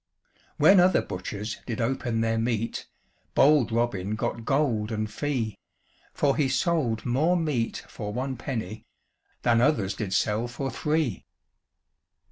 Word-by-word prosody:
When 195 -1 +7
other 180 +1 +4
butchers 100 +4 -5
did 115 - -3
open 120 -1 -1
their 115 0 +1
meat, 115 -1 -2 0.5
Bold 140 -4 +5
Robin 110 -4 0
got 115 +1 -3
gold 125 -7 +1
and 110 -1 -1
fee, 115 -2 -3 0.5
For 140 -1 +1
he 140 -3 +1
sold 130 -5 0
more 155 +9 +2
meat 145 -9 -1
for 105 -2 -6
one 130 +4 -3
penny 110 -3 -5 0.6
Than 115 -1 +4
others 115 -9 +2
did 105 -4 -4
sell 105 +4 +1
for 130 +2 -4
three. 150 - -1
120 Hz, 130 wpm, -26 LUFS, 110-140 Hz, 0.6 s, When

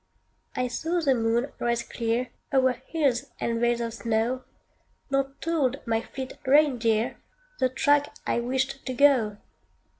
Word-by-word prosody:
I 250 - 0
saw 325 +8 -1
the 285 -5 +3
moon 235 +3 0
rise 235 0 0
clear 235 +1 -2 0.2
O'er 260 -1 +4 0.2
hills 280 -7 +1
and 230 0 -1
vales 240 0 +2
of 230 -1 -3
snow 235 +3 -1 0.7
Nor 275 0 0
told 290 -6 +1
my 225 -1 +1
fleet 260 +2 -7
reindeer 250 -6 +3 0.4
The 255 - +3
track 290 +3 +2
I - - +1
wished 265 +3 -1
to 255 - -2
go. 245 -7 +4
255 Hz, 140 wpm, -26 LUFS, 235-275 Hz, 0.7 s, O'er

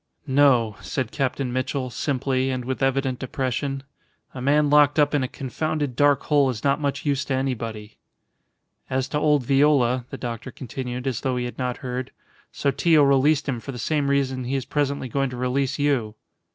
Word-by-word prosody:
"No," 130 -6 +3
said 130 -4 -3
Captain 135 -2 -2
Mitchell, 130 0 -2
simply, 130 0 -1
and 130 -2 -3
with 130 +1 -3
evident 135 -1 0
depression. 135 +1 -2 0.5
"A 130 - -7
man 145 +3 +3
locked 145 0 +5
up 145 -1 +3
in 145 - +2
a 130 - -1
confounded 145 +1 -3
dark 145 0 +3
hole 145 -3 +3
is 115 -4 -4
not 140 +1 +2
much 140 0 -2
use 140 -1 +1
to 135 - -1
anybody." 115 -5 -4 0.9
"As 130 0 0
to 150 - -1
old 150 -4 +2
Viola," 135 -3 +3
the 135 - -6
doctor 120 0 -5
continued, 125 0 -6
as 130 -4 -2
though 130 -2 -1
he 125 - -1
had 120 - -7
not 125 -1 -2
heard, 125 0 -3 0.4
"Sotillo 150 +2 +3
released 140 +2 +3
him 130 -4 -1
for 135 - -7
the 125 - -8
same 145 +3 0
reason 130 -2 0
he 130 +3 -2
is 135 -2 -2
presently 140 -1 -1
going 135 +2 -1
to 125 - -7
release 125 +2 0
you." 135 -7 0
135 Hz, 185 wpm, -24 LUFS, 125-140 Hz, 0.9 s, locked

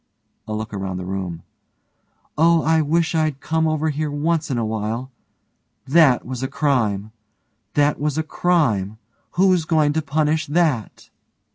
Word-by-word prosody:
(a 110 - -4
look 110 0 -5
around 95 -2 -4
the 90 - -5
room) 90 -3 -5 0.9
Oh, 165 +1 +4
I 160 +1 +3
wish 165 +3 +1
I'd 155 -4 0
come 160 +2 0
over 155 0 0
here 150 +1 -2
once 155 +3 -1
in 130 - -1
a 115 - 0
while! 110 +4 -3 0.7
That 140 -2 +4
was 125 -1 -5
a 130 - -1
crime! 110 -9 0 0.6
That 145 0 +2
was 150 +1 -1
a 160 - +1
crime! 130 - 0 0.4
Who's 185 -2 +3
going 155 -2 +2
to 160 - 0
punish 155 +1 0
that? 145 - -1
145 Hz, 150 wpm, -21 LUFS, 110-160 Hz, 0.9 s, Oh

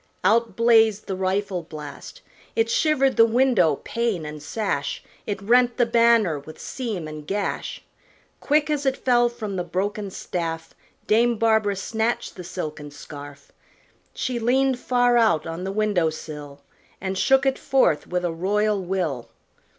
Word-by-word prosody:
out 220 +1 +2
blazed 225 -2 +4
the 190 - -3
rifle 190 0 -1
blast. 155 - -10 0.3
It 230 0 +1
shivered 275 -3 +2
the 230 - +8
window, 225 - +3
pane 230 -9 -1
and 150 0 -7
sash; 150 -5 -3 0.2
It 205 -2 -2
rent 245 +3 +3
the 245 - +4
banner 230 -8 +3
with 155 +3 -12
seam 215 -11 -4
and 155 -1 -9
gash. 200 0 -3 0.6
Quick, 300 +1 +1
as 290 -2 -1
it 270 - +1
fell, 240 -1 +3
from 215 -5 -5
the 180 - -1
broken 200 +4 -3
staff 165 -3 -4 0.3
Dame 235 +2 +3
Barbara 220 -2 +2
snatched 220 +4 -2
the 180 - -8
silken 155 -4 -6
scarf; 145 0 -11 0.6
She 250 -2 -3
leaned 260 +2 +2
far 245 -1 +2
out 220 -10 +3
on 165 +2 -5
the 195 - -2
window 200 -5 +1
sill, 150 -2 -9 0.4
And 190 0 -3
shook 270 +7 +3
it 270 -1 +1
forth 260 - +2
with 180 0 -1
a 175 - 0
royal 205 +4 0
will. 175 -9 -2
205 Hz, 150 wpm, -23 LUFS, 170-235 Hz, 0.6 s, the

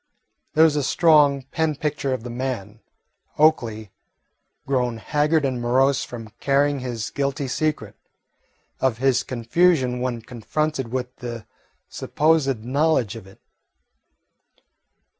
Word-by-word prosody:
There 160 - +6
was 160 -2 +4
a 145 - +1
strong 145 -2 +4
pen 160 -2 0
picture 145 -2 -2
of 130 -3 -2
the 120 - -6
man, 120 -4 -4 0.6
Oakley, 115 -9 +2 0.7
grown 125 -3 0
haggard 150 +5 +1
and 130 -3 -2
morose 130 +3 +2
from 115 -3 -9
carrying 140 +1 +2
his 120 -3 -4
guilty 140 0 -2
secret, 125 -7 -2 0.8
of 130 -4 +1
his 130 0 +2
confusion 130 +1 +1
when 125 -2 -3
confronted 135 +4 -2
with 125 +1 -4
the 120 -3 -7 0.4
supposed 145 -7 +1
knowledge 130 -4 +1
of 110 -4 -10
it. 95 - -17
130 Hz, 120 wpm, -23 LUFS, 120-150 Hz, 0.8 s, There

